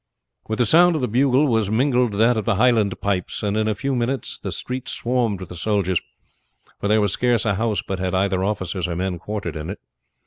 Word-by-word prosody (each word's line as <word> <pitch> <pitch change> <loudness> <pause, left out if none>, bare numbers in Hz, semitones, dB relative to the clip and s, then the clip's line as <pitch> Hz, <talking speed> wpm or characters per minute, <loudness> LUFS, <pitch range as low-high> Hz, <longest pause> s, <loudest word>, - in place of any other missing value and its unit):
With 110 - -2
the 120 - +3
sound 175 +7 +5
of 155 - -1
the 125 - 0
bugle 130 +5 +3
was 110 -6 +1
mingled 125 0 +2
that 115 +4 +3
of 110 - -1
the 115 -3 +2
Highland 110 -3 +2
pipes, 100 -1 -2
and 105 0 0
in 110 0 +1
a 110 - 0
few 135 +6 -2
minutes 125 +2 -2
the - - -5
streets 125 0 -5
swarmed 120 -5 -1
with 95 - -8
the 90 - -8
soldiers; 95 -1 0 0.8
for - - -2
there 105 +1 +4
was 100 -2 +1
scarce 120 -2 +1
a 105 - +2
house 110 +1 -1
but 95 -1 -3
had 95 0 -1
either 95 -1 +1
officers 95 -3 -2
or 85 - -3
men 90 0 -2
quartered 100 -5 -5
in 75 +2 -5
it. 100 - -5
105 Hz, 230 wpm, -22 LUFS, 95-120 Hz, 0.8 s, sound